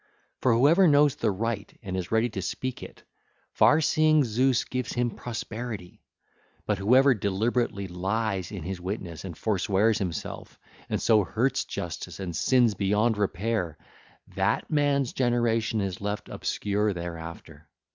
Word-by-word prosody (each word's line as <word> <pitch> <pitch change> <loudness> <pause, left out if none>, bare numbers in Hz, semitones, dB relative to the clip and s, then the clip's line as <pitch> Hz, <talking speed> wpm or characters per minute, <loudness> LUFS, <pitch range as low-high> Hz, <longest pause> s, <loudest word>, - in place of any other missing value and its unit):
For 125 -3 +3
whoever 160 +10 +5
knows 145 -2 +5
the 115 - 0
right 105 +1 -3
and 95 -2 -4
is 90 0 -4
ready 110 +2 +3
to 100 -3 -5
speak 130 +6 -4
it, - - -11 0.5
far 145 - +5
seeing 155 -1 +4
Zeus 125 +2 +2
gives 125 -2 -4
him 120 -1 0
prosperity; 110 -5 -6 0.6
but 105 -2 0
whoever 130 +7 +5
deliberately 105 0 -1
lies 95 +1 -2
in 95 -6 -6
his 90 +1 -5
witness 90 -3 -5
and 85 -4 -7
forswears 105 +1 +1
himself, 90 -6 -5 0.3
and - - 0
so 110 -2 +4
hurts 120 +8 0
Justice - - -6
and 90 -4 -4
sins 120 +2 +3
beyond 105 +4 +1
repair, 100 -3 -1 0.6
that - - 0
man's 145 -3 +1
generation 115 -3 +1
is 95 -1 -4
left 105 +1 -4
obscure 105 0 -1
thereafter. 85 -3 -8
110 Hz, 140 wpm, -27 LUFS, 95-120 Hz, 0.6 s, whoever